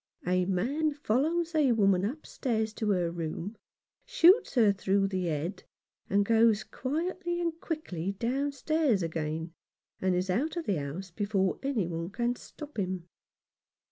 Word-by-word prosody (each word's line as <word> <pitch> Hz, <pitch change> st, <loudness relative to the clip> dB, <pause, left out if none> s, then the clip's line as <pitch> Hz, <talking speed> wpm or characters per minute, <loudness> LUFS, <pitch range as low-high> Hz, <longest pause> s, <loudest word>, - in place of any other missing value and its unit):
A 180 Hz, +1 st, +2 dB
man 275 Hz, -, 0 dB
follows 315 Hz, +6 st, 0 dB
a 290 Hz, -6 st, +4 dB
woman 195 Hz, -4 st, +3 dB
upstairs 225 Hz, -4 st, -2 dB
to 215 Hz, 0 st, -2 dB
her 180 Hz, -4 st, +1 dB
room, 170 Hz, +5 st, -4 dB, 0.5 s
shoots 470 Hz, -5 st, +5 dB
her 220 Hz, -5 st, +5 dB
through 195 Hz, 0 st, +1 dB
the 185 Hz, -2 st, -1 dB
head, 165 Hz, +4 st, -2 dB, 0.5 s
and 200 Hz, 0 st, +3 dB
goes 225 Hz, -1 st, +4 dB
quietly 345 Hz, +5 st, -2 dB
and 335 Hz, -1 st, -2 dB
quickly 195 Hz, -, -3 dB
downstairs 275 Hz, -, 0 dB
again, 160 Hz, 0 st, -3 dB, 0.5 s
and 185 Hz, -1 st, +2 dB
is 180 Hz, +1 st, 0 dB
out 295 Hz, -, 0 dB
of 335 Hz, -, -3 dB
the 195 Hz, -, +1 dB
house 160 Hz, +7 st, -5 dB
before 195 Hz, 0 st, 0 dB
any 270 Hz, -8 st, 0 dB
one 165 Hz, 0 st, -4 dB
can 240 Hz, +4 st, -1 dB
stop 295 Hz, -1 st, -9 dB
him. 185 Hz, -2 st, -3 dB
210 Hz, 140 wpm, -30 LUFS, 185-290 Hz, 0.5 s, shoots